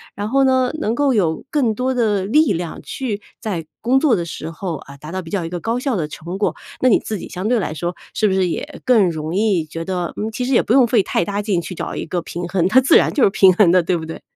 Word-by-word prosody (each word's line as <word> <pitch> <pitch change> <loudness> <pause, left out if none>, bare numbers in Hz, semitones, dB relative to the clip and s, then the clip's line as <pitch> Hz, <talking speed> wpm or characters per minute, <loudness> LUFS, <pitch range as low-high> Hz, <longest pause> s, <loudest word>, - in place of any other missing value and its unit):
然 205 +1 -3
后 270 +3 +3
呢， 260 -1 +3
能 225 -3 0
够 280 0 +2
有 170 -8 0
更 260 -7 +1
多 255 +4 -1
的 210 -6 +1
力 300 +8 +3
量 175 -2 -4
去 225 -7 -4 0.2
在 185 -8 -4
工 250 +3 +2
作 285 -3 +3
的 170 -3 -2
时 160 0 -6
候， 170 0 -4
啊， 140 0 -13
达 150 +3 -10
到 185 - -2
比 165 - -11
较 190 -5 -1
一 - - -5
个 175 0 -5
高 230 +7 -1
效 260 -1 -1
的 155 -6 -2
成 170 +5 -7
果， 205 - 0 0.3
那 255 - +4
你 220 - +5
自 215 - -4
己 - - -8
相 185 +3 -4
对 245 +1 +2
来 190 -7 -2
说， 175 +3 -3 0.2
是 215 - +2
不 195 - +1
是 190 -2 +1
也 290 - -5
更 225 -8 +4
容 155 0 -4
易 200 -3 +2
觉 165 +2 -6
得， 180 -2 -3
嗯， 215 - -2
其 225 +3 -4
实 255 - -2
也 - - +5
不 225 - 0
用 260 -1 +6
费 235 -2 +3
太 180 - 0
大 200 +3 -2
劲 200 -4 0
去 180 - -7
找 - - -5
一 - - -4
个 175 +2 -2
平 175 +1 -6
衡， 180 -2 +1
它 255 +7 +5
自 260 - +6
然 - - +2
就 275 - +2
是 - - +6
平 190 -1 +5
衡 180 -2 +4
的， 185 0 +5
对 175 +2 0
不 160 -2 -4
对？ 160 - -8
195 Hz, 310 characters per minute, -19 LUFS, 170-235 Hz, 0.3 s, 用